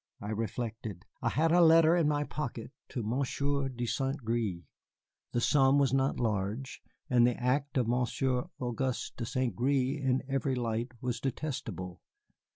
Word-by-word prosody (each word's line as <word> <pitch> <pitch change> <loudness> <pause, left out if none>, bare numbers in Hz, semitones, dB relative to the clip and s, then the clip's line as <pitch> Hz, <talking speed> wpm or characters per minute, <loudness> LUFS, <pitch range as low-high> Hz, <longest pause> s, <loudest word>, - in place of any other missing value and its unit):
I 105 - -5
reflected. 110 -2 -4 0.2
I - - +1
had 160 +2 +2
a 175 +1 +6
letter 165 0 +7
in 170 -4 +3
my 145 -1 +1
pocket 130 -6 -5 0.2
to 120 - -3
Monsieur 140 +4 0
de 120 -2 -4
Saint 135 +2 -2
Gré, 110 -7 -1 0.7
the 120 - 0
sum 135 +2 +4
was 135 -3 +3
not 135 0 +1
large, 110 +3 -2 0.3
and 120 -1 +5
the 125 - 0
act 140 +3 0
of 125 -3 +2
Monsieur 125 +1 0
Auguste 125 +1 -2
de 115 - -3
Saint 130 -5 -1
Gré 135 +3 +1
in 130 0 +1
every 135 -1 0
light 120 0 -2
was 125 -1 -2
detestable. 110 - -4
125 Hz, 160 wpm, -31 LUFS, 115-140 Hz, 0.7 s, letter